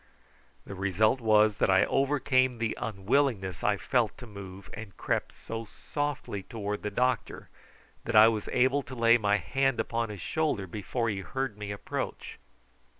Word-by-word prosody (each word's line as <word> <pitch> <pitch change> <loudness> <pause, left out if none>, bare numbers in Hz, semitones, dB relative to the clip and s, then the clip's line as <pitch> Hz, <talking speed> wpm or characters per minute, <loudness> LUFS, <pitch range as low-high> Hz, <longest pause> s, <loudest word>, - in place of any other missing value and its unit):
The - - -7
result 100 +6 +1
was 110 -1 +4
that - - +2
I 95 0 +5
overcame 130 -2 +2
the 115 -1 -1
unwillingness 105 - 0
I 105 -1 +2
felt 120 0 0
to 125 - -10
move, 100 -3 -10
and 110 -4 -9
crept - - -1
so 115 0 -7 0.3
softly 145 -8 -2
towards 105 0 -4
the 105 - -2
doctor 125 +2 -1 0.6
that 115 - -2
I 110 +1 +9
was 110 -2 -1
able 130 +3 +3
to 130 -1 -9
lay 115 0 +5
my 105 -1 +2
hand 135 +5 0
upon 115 -1 -1
his 105 -2 -7
shoulder 150 - -1
before 105 +6 -3
he 100 -3 -2
heard 130 +3 -3
me 105 -1 -7
approach. 100 0 -5
110 Hz, 160 wpm, -29 LUFS, 100-130 Hz, 0.6 s, I